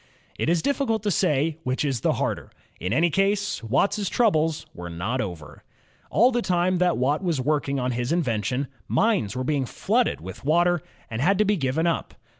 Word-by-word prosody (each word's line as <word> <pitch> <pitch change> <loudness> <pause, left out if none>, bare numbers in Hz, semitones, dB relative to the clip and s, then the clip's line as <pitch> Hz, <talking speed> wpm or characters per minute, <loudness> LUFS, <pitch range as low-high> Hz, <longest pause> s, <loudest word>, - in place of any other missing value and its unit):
It - - 0
is 170 -1 +2
difficult 250 -6 0
to 205 - +1
say 150 0 +1
which 130 +3 -1
is 130 -6 -1
the - - +2
harder. - - -2 0.3
In 90 - -3
any 160 +8 +3
case. 200 +3 +1
Watt's 190 - +1
troubles 165 -9 +1
were 85 0 -7
not 100 +10 -2
over. 85 -7 -7 0.5
All 240 +6 +4
the 240 -1 0
time 180 -2 +1
that 180 -1 +2
Watt 140 +7 +1
was 170 -6 0
working 140 0 0
on 125 0 -1
his 120 +2 -2
invention, 130 - 0 0.2
mines 200 - +1
were 130 - -2
being 135 -1 0
flooded - - 0
with 95 +3 -9
water 175 +3 +3 0.3
and 110 +2 -2
had 195 +6 +3
to 210 - +3
be 210 +1 +2
given 145 0 0
up. 170 -1 -1
155 Hz, 190 wpm, -25 LUFS, 125-185 Hz, 0.5 s, All